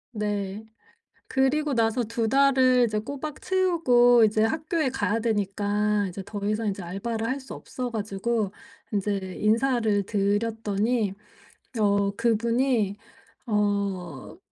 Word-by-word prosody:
네. 205 Hz, -1 st, -3 dB, 0.6 s
그리고 280 Hz, +3 st, +1 dB
나서 230 Hz, +1 st, +1 dB
2 230 Hz, 0 st, -2 dB
달을 260 Hz, -1 st, +4 dB
이제 215 Hz, -2 st, -1 dB
꼬박 280 Hz, +6 st, -6 dB
채우고 255 Hz, -11 st, +4 dB
이제 215 Hz, 0 st, +2 dB
학교에 310 Hz, +4 st, 0 dB
가야 225 Hz, -4 st, -1 dB
되니까 205 Hz, -1 st, 0 dB
이제 185 Hz, +2 st, -7 dB
더 205 Hz, +2 st, -6 dB
이상 215 Hz, +1 st, -1 dB
이제 195 Hz, -2 st, -3 dB
알바를 220 Hz, +6 st, -3 dB
할 260 Hz, +3 st, -1 dB
수 265 Hz, -, -10 dB
없어가지고 220 Hz, -3 st, -3 dB, 0.4 s
인제 195 Hz, -2 st, -2 dB
인사를 220 Hz, -2 st, +2 dB
드렸더니 210 Hz, +1 st, 0 dB, 0.7 s
어 200 Hz, -1 st, +2 dB
그분이 230 Hz, -2 st, +1 dB, 0.5 s
어 200 Hz, -, -2 dB
220 Hz, 230 characters per minute, -26 LUFS, 205-245 Hz, 0.7 s, 달을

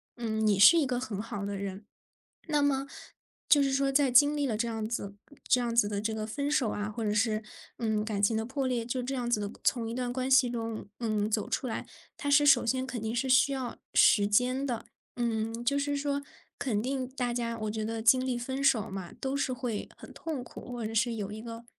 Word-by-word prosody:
嗯， 220 Hz, -2 st, -2 dB
你 210 Hz, -2 st, +3 dB
是 200 Hz, -, +9 dB
一 285 Hz, -, +1 dB
个 245 Hz, -1 st, -1 dB
很 215 Hz, -6 st, -4 dB
好 205 Hz, -2 st, -5 dB
的 200 Hz, 0 st, -3 dB
人。 195 Hz, +1 st, -6 dB, 0.6 s
那 295 Hz, -2 st, +2 dB
么， 275 Hz, -1 st, +1 dB, 0.6 s
就 290 Hz, -2 st, +6 dB
是 270 Hz, -1 st, 0 dB
说 275 Hz, 0 st, +2 dB
在 275 Hz, -2 st, +3 dB
经 290 Hz, +4 st, +6 dB
历 290 Hz, -, +1 dB
了 230 Hz, -5 st, -1 dB
这 235 Hz, +2 st, -1 dB
样 220 Hz, -1 st, -3 dB
子 200 Hz, -3 st, -4 dB, 0.3 s
这 250 Hz, -, +4 dB
样 240 Hz, -1 st, -2 dB
子 220 Hz, -3 st, +4 dB
的 205 Hz, -1 st, -2 dB
这 220 Hz, +1 st, -2 dB
个 215 Hz, -1 st, -4 dB
分 280 Hz, +6 st, -2 dB
手 265 Hz, -6 st, +2 dB
啊， 205 Hz, 0 st, -3 dB
或 220 Hz, +2 st, -5 dB
者 210 Hz, -, 0 dB
是， 215 Hz, 0 st, +1 dB, 0.4 s
嗯， 220 Hz, -2 st, 0 dB
感 210 Hz, -2 st, -2 dB
情 220 Hz, +2 st, +3 dB
的 220 Hz, -, -2 dB
破 265 Hz, +2 st, -2 dB
裂， 240 Hz, -2 st, -1 dB
就 250 Hz, +2 st, -2 dB
这 265 Hz, +2 st, -3 dB
样 245 Hz, -2 st, -2 dB
子 240 Hz, -3 st, +1 dB
的 205 Hz, 0 st, -3 dB
从 230 Hz, -3 st, +1 dB
一 230 Hz, -, -4 dB
段 245 Hz, -1 st, -2 dB
关 260 Hz, +1 st, -2 dB
系 265 Hz, -1 st, +6 dB
中， 225 Hz, -3 st, -4 dB
嗯， 215 Hz, -3 st, 0 dB
走 215 Hz, -1 st, -1 dB
出 -, -, -1 dB
来， 235 Hz, -, -4 dB, 0.3 s
它 285 Hz, -, -4 dB
是 290 Hz, +1 st, +5 dB
首 285 Hz, -, +6 dB
先 260 Hz, +2 st, 0 dB
肯 250 Hz, -4 st, -5 dB
定 220 Hz, +1 st, -3 dB
是 260 Hz, +3 st, 0 dB
需 260 Hz, +2 st, +5 dB
要 260 Hz, -3 st, -4 dB, 0.2 s
时 205 Hz, -2 st, +6 dB
间 250 Hz, +6 st, +2 dB
的， 240 Hz, -5 st, -3 dB, 0.3 s
嗯， 230 Hz, -1 st, -2 dB
就 280 Hz, +3 st, +2 dB
是 285 Hz, 0 st, -1 dB
说 285 Hz, 0 st, -1 dB, 0.4 s
肯 225 Hz, -6 st, 0 dB
定 260 Hz, +3 st, -2 dB
大 250 Hz, -2 st, -2 dB
家 235 Hz, -1 st, -2 dB
我 215 Hz, -1 st, -3 dB
觉 220 Hz, 0 st, -3 dB
得 225 Hz, 0 st, -3 dB
经 255 Hz, +3 st, +5 dB
历 255 Hz, -2 st, -1 dB
分 265 Hz, +3 st, -3 dB
手 230 Hz, -6 st, +3 dB
嘛， 190 Hz, -2 st, -6 dB
都 270 Hz, +1 st, -2 dB
是 280 Hz, -2 st, 0 dB
会 245 Hz, -4 st, -4 dB
很 -, -, -12 dB
痛 300 Hz, -6 st, -5 dB
苦， 250 Hz, -, -10 dB
或 240 Hz, -2 st, -4 dB
者 220 Hz, -, -4 dB
是 235 Hz, +1 st, +1 dB
有 205 Hz, -2 st, -4 dB
一 215 Hz, -, -7 dB
个 230 Hz, 0 st, -8 dB
235 Hz, 260 characters per minute, -29 LUFS, 220-265 Hz, 0.6 s, 是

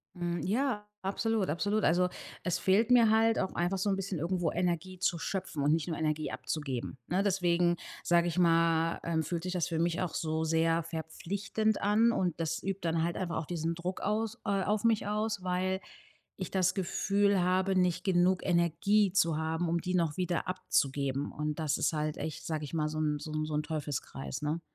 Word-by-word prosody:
Hm, 175 Hz, -1 st, -2 dB
ja, 215 Hz, 0 st, 0 dB
absolut. 205 Hz, +1 st, 0 dB
Absolut. 205 Hz, +7 st, 0 dB
Also, 180 Hz, +2 st, +3 dB, 0.3 s
es 180 Hz, -, 0 dB
fehlt 205 Hz, +5 st, +3 dB
mir 235 Hz, -3 st, +7 dB
halt 225 Hz, +1 st, +4 dB
auch 190 Hz, -, -1 dB
einfach 175 Hz, +3 st, 0 dB
so 190 Hz, +2 st, 0 dB
'n 195 Hz, -, +2 dB
bisschen 195 Hz, -3 st, -3 dB
irgendwo 170 Hz, +1 st, 0 dB
Energie 180 Hz, +1 st, -1 dB
zu 175 Hz, -2 st, +1 dB
schöpfen 185 Hz, -5 st, -3 dB
und 145 Hz, -, +3 dB
nicht 160 Hz, +1 st, +1 dB
nur 165 Hz, -, -2 dB
Energie 155 Hz, -1 st, -1 dB
abzugeben. 135 Hz, -5 st, -4 dB
Ne, 185 Hz, +3 st, +1 dB
deswegen 175 Hz, -3 st, +2 dB, 0.3 s
sage 175 Hz, 0 st, +3 dB
ich 175 Hz, +1 st, -1 dB
mal, 165 Hz, -1 st, +3 dB
ähm, 160 Hz, -1 st, 0 dB
fühlt 165 Hz, +1 st, -3 dB
sich 180 Hz, 0 st, -3 dB
das 180 Hz, -3 st, 0 dB
für 165 Hz, -2 st, -2 dB
mich 170 Hz, +1 st, +1 dB
auch 180 Hz, -3 st, -2 dB
so 160 Hz, -1 st, -1 dB
sehr 165 Hz, +1 st, +2 dB
verpflichtend 195 Hz, +7 st, -2 dB
an. 215 Hz, +3 st, +4 dB
Und 180 Hz, -7 st, -1 dB
das 165 Hz, 0 st, -2 dB
übt 195 Hz, 0 st, -2 dB
dann 165 Hz, -1 st, 0 dB
halt 170 Hz, +1 st, -1 dB
einfach 175 Hz, -3 st, -2 dB
auch 160 Hz, -, -3 dB
diesen 165 Hz, 0 st, -2 dB
Druck 175 Hz, +2 st, -4 dB
aus 220 Hz, +2 st, -1 dB
äh, 200 Hz, -2 st, +1 dB
auf 210 Hz, +2 st, 0 dB
mich 225 Hz, -3 st, +2 dB
aus, 210 Hz, -1 st, -1 dB
weil 185 Hz, +1 st, 0 dB, 0.6 s
ich -, -, -4 dB
das 185 Hz, -1 st, +2 dB
Gefühl 200 Hz, +2 st, +1 dB
habe, 185 Hz, +2 st, +2 dB
nicht 180 Hz, -2 st, +2 dB
genug 185 Hz, -1 st, +3 dB
Energie 185 Hz, +4 st, +2 dB
zu 165 Hz, -4 st, +2 dB
haben, 160 Hz, +2 st, -1 dB
um 170 Hz, +1 st, +1 dB
die 180 Hz, -, -3 dB
noch 165 Hz, -4 st, +1 dB
wieder 180 Hz, -2 st, -1 dB
abzugeben. 140 Hz, -6 st, 0 dB
Und 150 Hz, +1 st, -3 dB
das 155 Hz, -3 st, 0 dB
ist -, -, +1 dB
halt 155 Hz, -1 st, -2 dB
echt, 155 Hz, -, -5 dB
sage 155 Hz, -2 st, -2 dB
ich 145 Hz, -, -7 dB
mal 155 Hz, -2 st, +1 dB
so 155 Hz, 0 st, -3 dB
'n 150 Hz, -1 st, +1 dB
so 155 Hz, -, -7 dB
'n 155 Hz, 0 st, -1 dB
so 155 Hz, -, -5 dB
'n 150 Hz, -, 0 dB
Teufelskreis, 145 Hz, -3 st, -4 dB
ne? 150 Hz, +3 st, -1 dB
175 Hz, 205 wpm, -31 LUFS, 160-195 Hz, 0.6 s, mir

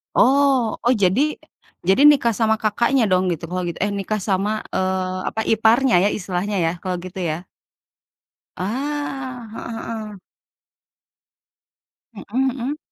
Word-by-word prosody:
Oh 265 Hz, -3 st, +3 dB
oh 245 Hz, -, +5 dB
jadi 200 Hz, +3 st, +2 dB, 0.6 s
jadi 190 Hz, +8 st, +3 dB
nikah 270 Hz, -6 st, +6 dB
sama 220 Hz, -1 st, +3 dB
Kakaknya 235 Hz, +4 st, +2 dB
dong 185 Hz, 0 st, +3 dB
gitu 165 Hz, -, -8 dB
kalau 180 Hz, 0 st, -2 dB
gitu 170 Hz, -, -5 dB
eh, 205 Hz, -, +1 dB
nikah 210 Hz, +1 st, -2 dB
sama, 205 Hz, +3 st, 0 dB
eee, 185 Hz, 0 st, -1 dB
apa, 220 Hz, -, -3 dB
iparnya 225 Hz, +2 st, +4 dB
ya -, -, +4 dB
istilahnya 195 Hz, +1 st, -3 dB
ya 165 Hz, -, +1 dB
kalau 185 Hz, -1 st, -2 dB
gitu 185 Hz, +1 st, -7 dB
ya. 160 Hz, +4 st, -4 dB, 1.1 s
Ah, 260 Hz, +2 st, -4 dB
heeh 225 Hz, 0 st, -6 dB
heeh. 215 Hz, -2 st, -6 dB, 2.0 s
Mhm 205 Hz, -, -9 dB, 0.2 s
mhm. 265 Hz, +3 st, -3 dB
215 Hz, 130 wpm, -21 LUFS, 190-250 Hz, 2.0 s, nikah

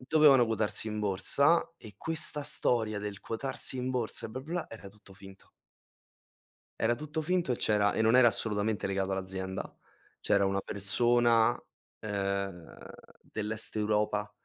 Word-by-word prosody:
Dovevano 135 Hz, -2 st, +5 dB
quotarsi 110 Hz, 0 st, -1 dB
in 105 Hz, 0 st, -3 dB
borsa 105 Hz, -, +1 dB
e 110 Hz, -, -13 dB
questa 155 Hz, 0 st, -1 dB
storia 110 Hz, -6 st, 0 dB
del 100 Hz, -1 st, -6 dB
quotarsi 130 Hz, +2 st, -2 dB
in 125 Hz, +1 st, -2 dB
borsa 120 Hz, -3 st, -2 dB
e -, -, -12 dB
bla, 130 Hz, +4 st, -6 dB
bla, 165 Hz, +4 st, -4 dB
era 105 Hz, -3 st, -10 dB
tutto 100 Hz, -1 st, -17 dB
finto. 95 Hz, 0 st, -14 dB, 1.3 s
Era 115 Hz, +2 st, +2 dB
tutto 155 Hz, +4 st, -4 dB
finto 175 Hz, -4 st, 0 dB
e -, -, -2 dB
c'era 105 Hz, -2 st, +1 dB
e 110 Hz, -, +1 dB
non 110 Hz, +3 st, +4 dB
era 130 Hz, -2 st, +7 dB
assolutamente 105 Hz, -2 st, 0 dB
legato 95 Hz, 0 st, -1 dB
all'azienda. 95 Hz, 0 st, -4 dB, 0.4 s
C'era 100 Hz, -1 st, +2 dB
una 95 Hz, 0 st, 0 dB
persona, 115 Hz, +4 st, +2 dB, 0.4 s
ehm, 100 Hz, -4 st, -3 dB, 0.4 s
dell'est 110 Hz, +1 st, -4 dB
Europa 105 Hz, -1 st, 0 dB
110 Hz, 140 wpm, -30 LUFS, 100-125 Hz, 1.3 s, era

